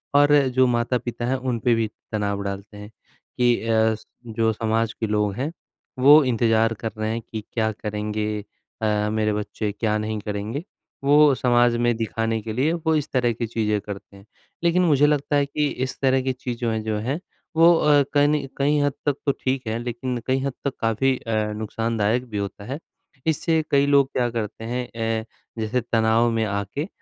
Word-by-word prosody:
और 145 Hz, +1 st, +6 dB, 0.2 s
जो 130 Hz, 0 st, +6 dB
माता 120 Hz, +1 st, +1 dB
पिता 120 Hz, 0 st, -5 dB
हैं, 130 Hz, +2 st, +1 dB
उन 125 Hz, -3 st, -2 dB
पे 120 Hz, +1 st, +3 dB
भी 115 Hz, -1 st, 0 dB, 0.2 s
तनाव 100 Hz, -1 st, -1 dB
डालते 100 Hz, +1 st, -6 dB
हैं, 105 Hz, 0 st, -9 dB, 0.5 s
कि 120 Hz, -1 st, +4 dB
अ, 110 Hz, 0 st, +3 dB
स 110 Hz, -, -15 dB, 0.2 s
जो 115 Hz, 0 st, 0 dB
समाज 115 Hz, +1 st, 0 dB
के 110 Hz, -, -3 dB
लोग 105 Hz, -1 st, +1 dB
हैं, 140 Hz, +6 st, -2 dB, 0.5 s
वो 145 Hz, +4 st, +8 dB
इंतज़ार 115 Hz, -2 st, +2 dB
कर 115 Hz, -, -2 dB
रहे 110 Hz, 0 st, -1 dB
हैं 115 Hz, +1 st, -3 dB
कि 110 Hz, -1 st, -7 dB
क्या 110 Hz, -2 st, +1 dB
करेंगे 105 Hz, 0 st, -3 dB, 0.4 s
अ, 105 Hz, -1 st, +1 dB
मेरे 110 Hz, 0 st, +1 dB
बच्चे, 105 Hz, 0 st, -3 dB
क्या 105 Hz, +1 st, -1 dB
नहीं 110 Hz, 0 st, -3 dB
करेंगे, 105 Hz, +8 st, -4 dB, 0.4 s
वो 145 Hz, 0 st, +6 dB
समाज 120 Hz, -1 st, +3 dB
में 120 Hz, -1 st, +2 dB
दिखाने 115 Hz, 0 st, -1 dB
के 110 Hz, 0 st, -5 dB
लिए 140 Hz, +8 st, +1 dB
वो 160 Hz, -1 st, 0 dB
इस 150 Hz, -, -1 dB
तरह 125 Hz, -2 st, +2 dB
की 115 Hz, +1 st, -3 dB
चीज़ें 105 Hz, -2 st, 0 dB
करते 100 Hz, 0 st, -9 dB
हैं। 100 Hz, -, -17 dB, 0.4 s
लेकिन 170 Hz, +1 st, +3 dB
मुझे 145 Hz, -3 st, +4 dB
लगता 145 Hz, 0 st, +1 dB
है 145 Hz, -1 st, +3 dB
कि 150 Hz, +1 st, -1 dB, 0.2 s
इस 130 Hz, -, -7 dB
तरह 130 Hz, -1 st, +3 dB
की 130 Hz, 0 st, -1 dB
चीजों 120 Hz, -2 st, -3 dB
ए 110 Hz, -, -1 dB
जो 110 Hz, -1 st, -2 dB
हैं 130 Hz, +9 st, -2 dB, 0.4 s
वो 165 Hz, +2 st, +7 dB
अ, 150 Hz, -3 st, +4 dB
कनि 145 Hz, -1 st, +3 dB
कई 145 Hz, +2 st, +2 dB
हद 145 Hz, -1 st, +1 dB
तक 145 Hz, -2 st, +2 dB
तो 140 Hz, -, +4 dB
ठीक 130 Hz, -2 st, -2 dB
है 110 Hz, +1 st, -1 dB
लेकिन 120 Hz, +1 st, -3 dB
कई 130 Hz, +1 st, +2 dB
हद 140 Hz, 0 st, -2 dB
तक 140 Hz, -, 0 dB
काफ़ी 120 Hz, +4 st, +2 dB
अ, 110 Hz, -2 st, -1 dB
नुक़सानदायक 110 Hz, +2 st, -1 dB
भी 105 Hz, -, -4 dB
होता 100 Hz, 0 st, -4 dB
है। 135 Hz, +5 st, -5 dB, 0.5 s
इससे 160 Hz, +1 st, +2 dB
कई 140 Hz, 0 st, +4 dB
लोग 140 Hz, -1 st, +4 dB
क्या 120 Hz, -1 st, 0 dB
करते 115 Hz, -1 st, -4 dB
हैं 125 Hz, +2 st, -3 dB
ए 115 Hz, 0 st, -1 dB, 0.3 s
जैसे 110 Hz, +3 st, 0 dB
तनाव 115 Hz, 0 st, +2 dB
में 115 Hz, -1 st, 0 dB
आके 100 Hz, -, -3 dB
115 Hz, 195 wpm, -23 LUFS, 110-135 Hz, 0.5 s, वो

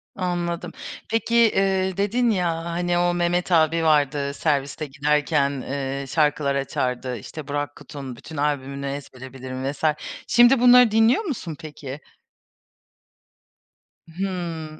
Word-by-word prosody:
Anladım. 175 Hz, -2 st, -2 dB, 0.4 s
Peki, 225 Hz, +1 st, 0 dB
eee, 195 Hz, -5 st, +3 dB
dedin, 230 Hz, +5 st, +1 dB
ya, 180 Hz, -5 st, +1 dB
ha 165 Hz, -, -6 dB
hani 175 Hz, +1 st, -1 dB
o 175 Hz, 0 st, +2 dB
Mehmet 175 Hz, +1 st, 0 dB
abi 165 Hz, 0 st, +3 dB
vardı, 145 Hz, -2 st, +2 dB
serviste 145 Hz, 0 st, -1 dB
giderken, 145 Hz, 0 st, +1 dB
eee, 135 Hz, +1 st, -4 dB
şarkılar 150 Hz, -1 st, +1 dB
açardı, 125 Hz, -2 st, -2 dB
işte 145 Hz, +7 st, -9 dB
Burak 145 Hz, 0 st, -3 dB
Kut'un 140 Hz, -3 st, -8 dB
bütün 155 Hz, +5 st, -10 dB
albümünü 140 Hz, -1 st, -2 dB
ezbere 130 Hz, -2 st, -7 dB
bilirdim 130 Hz, +1 st, -4 dB
vs. 145 Hz, -, -13 dB, 0.4 s
Şimdi 240 Hz, +2 st, +6 dB
bunları 250 Hz, -2 st, +7 dB
dinliyor 225 Hz, -, +4 dB
musun, 215 Hz, -, -4 dB
peki? 145 Hz, -2 st, -8 dB, 2.1 s
Hımm. 170 Hz, -4 st, -4 dB
155 Hz, 120 wpm, -23 LUFS, 140-180 Hz, 2.1 s, bunları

